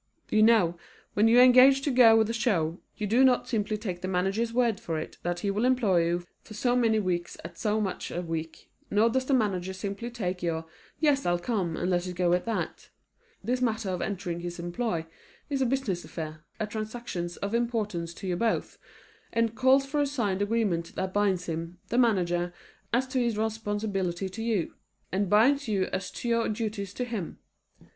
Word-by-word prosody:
You 215 - +4
know, 210 -7 +4 0.3
when 210 +2 +4
you 235 +2 +6
engage 255 +2 +7
to 285 - +1
go 240 -3 +7
with 220 -1 +3
a 230 - -2
show, 185 -8 0 0.2
you 210 - -2
do 235 +6 +4
not 255 -2 +4
simply 215 -2 -1
take 185 -5 -5
the 185 - -3
manager's 195 +5 0
word 235 -3 +1
for 165 -2 -3
it 155 - -6
that 175 0 -2
he 200 - 0
will 205 +3 -1
employ 220 -10 +3
you 175 +1 -1 0.2
for 215 - -12
so 245 +3 +1
many 230 -3 +3
weeks 175 -3 -2
at 170 0 -8
so 215 0 +1
much 195 -3 -3
a 175 - -3
week, 165 -1 -6 0.2
nor 220 +3 +3
does 260 +2 0
the 275 - +2
manager 190 -6 0
simply 200 +5 -5
take 185 -7 -3
your 165 -2 -2 0.3
"Yes, 290 -3 +3
I'll 175 0 +2
come," 175 -4 -2
and 180 - -1
let 175 0 0
it 180 - -5
go 175 -1 +2
at 180 - +1
that. 230 -1 -3 0.5
This 250 +2 -1
matter 225 -4 0
of 180 -1 -2
entering 180 -4 -3
his 175 0 -5
employ 175 0 -2 0.5
is 275 -1 0
a 260 - +3
business 235 -9 -1
affair, 155 -1 -7
a 215 - 0
transaction 215 -4 -4
of 200 +2 -2
importance 210 -8 -1
to 195 - -7
you 180 - 0
both, 225 +3 -1 0.5
and 230 -1 +1
calls 260 +3 +4
for 290 +2 0
a 285 - +2
signed 210 -9 -1
agreement 205 -6 0
that 190 0 -3
binds 195 -3 +1
him, 165 +1 -5
the 240 - +2
manager, 175 -7 +2 0.4
as 250 +3 +2
to 255 - 0
his 235 -3 0
responsibility 205 -4 -2
to 220 +4 -7
you, 225 -6 -1 0.4
and 190 0 0
binds 265 +7 +4
you 200 -3 +1
as 185 -1 -2
to - - -6
your 230 -1 +1
duties 210 -3 -3
to 250 - -2
him. 220 -8 -5
210 Hz, 200 wpm, -28 LUFS, 180-235 Hz, 0.5 s, engage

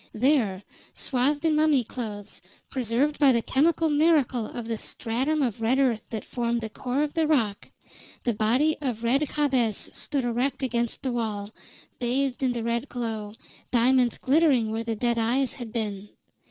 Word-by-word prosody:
There, 220 -6 +2 0.3
swathed 285 +4 0
in 315 -1 +3
mummy 305 -4 +3
clothes, 210 -3 -7 0.3
preserved 260 +4 0
by 280 -3 +6
the 235 -2 +1
chemical 320 +4 +2
miracle 295 -7 +2
of 240 - -6
the 225 -2 -3
stratum 270 +7 -1
of 235 -3 -2
red 235 +4 +2
earth 255 -5 +2
that 220 -2 -5
formed 235 -1 -1
the 220 -1 -5
core 255 +6 -1
of 295 - -3
the 325 -2 +1
rock, 225 -10 0 0.5
the 240 - +1
body 250 +9 +2
of 240 -5 -3
Red 250 +5 +2
Jabez 260 -7 +1
stood 275 -4 -2
erect 250 +3 -1
against 240 -2 -1
the 260 - -1
wall, 215 -4 -3 0.5
bathed 255 +2 -1
in 255 -2 +1
the 235 -2 -3
red 235 +3 -2
glow, 220 -3 -4 0.4
diamonds 245 0 +3
glittering 265 -6 +3
where 225 +1 -2
the 230 -1 -2
dead 235 +1 0
eyes 250 +4 +1
had 240 -3 -7
been. 210 -3 -4
245 Hz, 165 wpm, -26 LUFS, 225-275 Hz, 0.5 s, by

